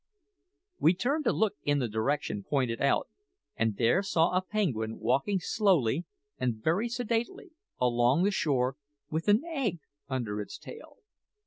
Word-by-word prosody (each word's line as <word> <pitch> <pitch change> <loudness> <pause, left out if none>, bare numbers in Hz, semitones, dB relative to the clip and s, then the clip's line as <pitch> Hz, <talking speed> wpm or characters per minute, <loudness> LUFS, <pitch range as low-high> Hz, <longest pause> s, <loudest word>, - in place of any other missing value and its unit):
We 165 +3 +4
turned 280 - 0
to - - +4
look 210 -8 0
in 145 0 +1
the 130 -4 0
direction 110 -1 -1
pointed 125 -2 -1
out, 140 - +2 0.5
and 115 -3 0
there 120 +11 +3
saw 170 -4 +2
a 185 - +3
penguin 140 - -1
walking 140 - +1
slowly 175 - +2 0.3
and 125 -3 0
very 170 - 0
sedately 240 - -2 0.3
along 125 +5 +3
the 200 - +3
shore 135 -7 0 0.3
with 160 +3 -2
an 210 +6 +4
egg 265 - -2 0.3
under 115 -6 -2
its 105 - -7
tail. 470 +1 -12
155 Hz, 145 wpm, -29 LUFS, -, 0.5 s, We